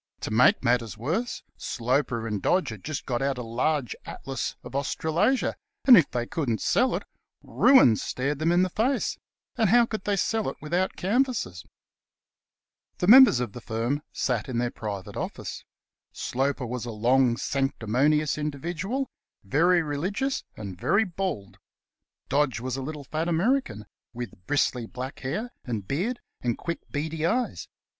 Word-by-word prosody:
To - - -4
make 115 +4 +4
matters 115 -3 +1
worse, 170 - -2
Sloper 120 -1 -1
and 105 -3 -2
Dodge 185 +1 +2
had 110 -4 -8
just 155 -2 -4
got 120 -1 -1
out 135 -1 0
a 125 - -4
large 125 +4 -1
Atlas 135 -1 -5
of - - -9
Australasia, 160 - +1 0.3
and 255 - +10
if 165 - +5
they 120 -1 -2
couldn't 120 -6 -1
sell 250 0 +2
it, - - -3 0.4
ruin 245 - +6
stared 140 +3 -2
them 160 +2 +2
in 175 +1 +4
the 185 - -1
face; 250 +8 0 0.4
and 220 -5 +3
how 240 +3 +6
could 215 -3 -5
they 205 - +1
sell 220 +2 0
it - - -8
without 175 +5 -1
canvassers? 205 - -1 1.3
The - - -1
members 245 - +9
of 120 -5 -3
the 120 - -8
firm 120 +6 -2
sat 125 -2 -1
in 125 - -2
their 120 0 0
private 100 -4 -6
office. - - -5 0.5
Sloper 135 +1 -1
was 120 0 -4
a 120 - -4
long, 120 +2 +3
sanctimonious 140 +4 +1
individual, 170 - -3 0.4
very 165 - +3
religious 190 - -2
and 95 -4 -7
very 220 - +3
bald. 180 - -4 0.7
Dodge 140 -3 +1
was 130 +1 -3
a 135 - -4
little, 150 +2 -6
fat 155 +5 -3
American, 175 - 0 0.3
with 120 -6 -8
bristly, 125 -5 +1
black 130 +3 -7
hair 210 - -3
and 110 -6 -4
beard, 205 - -1 0.2
and 120 -2 -1
quick, 170 0 -4
beady 155 +2 -3
eyes. 240 +9 0
140 Hz, 155 wpm, -26 LUFS, 120-185 Hz, 1.3 s, and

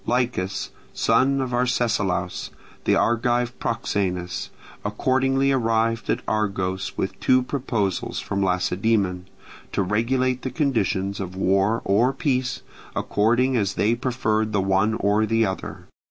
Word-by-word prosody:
Lichas, 120 -6 -1 0.2
son 135 +1 +2
of 130 -2 -3
Arcesilaus, 115 -8 0 0.4
the - - +4
Argive 120 +1 +1
proxenus, 90 -6 -2 0.3
accordingly 135 +5 +1
arrived 115 -2 +1
at - - 0
Argos 100 -3 -1
with 95 - -3
two 130 0 +3
proposals 115 -9 -2
from 100 - -2
Lacedaemon, 95 0 0 0.4
to - - 0
regulate 125 +6 0
the 130 - -3
conditions 110 - 0
of 95 -1 -5
war 95 +3 +2
or 115 +7 +3
peace, 130 -2 -1 0.3
according 120 +5 +2
as 100 -4 0
they 110 +3 +2
preferred 115 -4 0
the 100 - +2
one 95 +3 +2
or 105 +1 +2
the 115 +1 +2
other. 95 -1 -5
110 Hz, 125 wpm, -23 LUFS, 95-125 Hz, 0.4 s, the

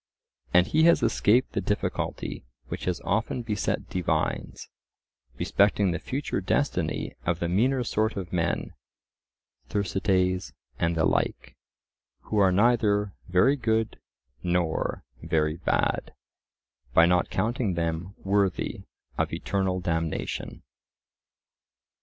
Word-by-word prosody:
And 90 0 +5
he 155 - +3
has 170 - +5
escaped 120 +5 +3
the - - -1
difficulty - - -2 0.3
which - - -5
has 90 -1 -1
often 110 +4 -1
beset 105 -4 -2
divines, 80 -3 -2 0.7
respecting 100 -1 +2
the 85 - -2
future 135 -6 -3
destiny 95 - -1
of 85 -1 0
the 85 - -2
meaner 125 +9 +2
sort 110 -1 0
of 95 -2 -5
men 85 -1 -1 1.0
(Thersites 95 -2 0 0.3
and 85 0 +1
the 80 - +3
like), - - -1 0.7
who 105 - -1
are 95 -2 +5
neither 105 -1 +3
very 95 +11 +4
good 110 -4 0 0.4
nor 85 -2 -1 0.2
very 80 -1 0
bad, - - 0 0.8
by 80 - +8
not 90 +1 +2
counting 110 -1 0
them 85 +3 -2
worthy 100 -1 0 0.3
of - - +1
eternal 95 -2 -1
damnation. 80 -2 -3
95 Hz, 110 wpm, -27 LUFS, 85-110 Hz, 1.0 s, by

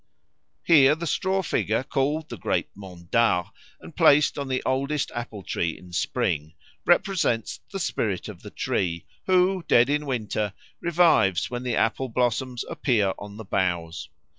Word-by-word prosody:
_" - - -50 0.6
Here 150 -3 +6
the 165 +2 -5
straw 190 +3 0
figure, 115 - 0
called 145 +4 -1
"the - - -5
great - - -1
mondard" 90 0 0 0.3
and - - -13
placed 145 0 +4
on 140 - -3
the 130 -1 -1
oldest 140 +2 -1
apple 115 -4 -6
tree 85 -2 -2
in 90 -1 -15
spring, 80 -2 -1 0.3
represents 165 - +1
the 195 - -4
spirit 105 - -2
of - - -10
the - - -9
tree, 85 -2 -2 0.2
who, 185 0 +3
dead 120 +3 +5
in 150 0 -1
winter, 110 -5 -2 0.3
revives 165 - +3
when 120 0 -3
the 125 -2 -2
apple 130 +4 0
blossoms 125 +1 -1
appear 105 -8 +1
on 100 0 -9
the 110 - -8
boughs. 85 -5 -2
120 Hz, 155 wpm, -25 LUFS, 95-150 Hz, 0.6 s, Here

